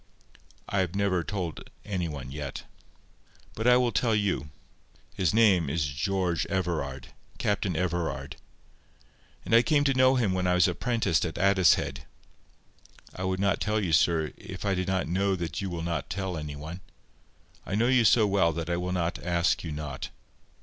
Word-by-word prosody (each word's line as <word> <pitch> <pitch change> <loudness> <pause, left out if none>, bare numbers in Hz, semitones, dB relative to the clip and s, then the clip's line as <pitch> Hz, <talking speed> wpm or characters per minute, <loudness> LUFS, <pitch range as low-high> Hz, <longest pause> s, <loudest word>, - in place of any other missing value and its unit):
I 100 - -1
have 95 -1 -1
never 100 -3 +1
told 90 -5 -5 0.2
any 95 -5 -2
one 70 -4 -7
yet. 70 -1 -6 0.9
But 110 +2 -2
I 125 0 +7
will 125 -1 +2
tell 115 -2 +1
you. 95 -9 -1 0.6
His 95 -4 +1
name 100 -9 +4
is 75 +1 0
George 85 +4 -1
Everard—Captain 90 +2 -3
Everard. 85 -1 -2 1.1
I 115 +1 +5
came 145 +2 +2
to 140 -1 +2
know 130 0 +4
him 110 -7 +1
when 90 0 0
I 90 - +3
was 90 -2 +5
apprenticed 115 -9 0
at 85 -3 -4
Addicehead. 90 -8 +2 1.1
I 90 - -5
would 95 0 -1
not 100 0 +1
tell 110 0 +1
you, 90 -6 -1
sir, 80 -2 +2
if - - -8
I 100 - +2
did 90 -1 -2
not 95 -2 0
know 95 +3 +1
that 85 +1 -4
you 95 - -3
will 85 -2 -4
not 85 -1 -3
tell 95 +1 -3
any 75 -2 -5
one. 80 +5 -8 0.8
I 100 - -3
know 110 +3 +2
you 125 -1 +4
so 110 0 +5
well 95 -5 +3
that 85 +1 -4
I 85 - +1
will 90 +1 -2
not 85 -2 -2
ask 85 -1 +1
you 80 - -5
not. 75 -3 -5
90 Hz, 170 wpm, -28 LUFS, 80-100 Hz, 1.1 s, I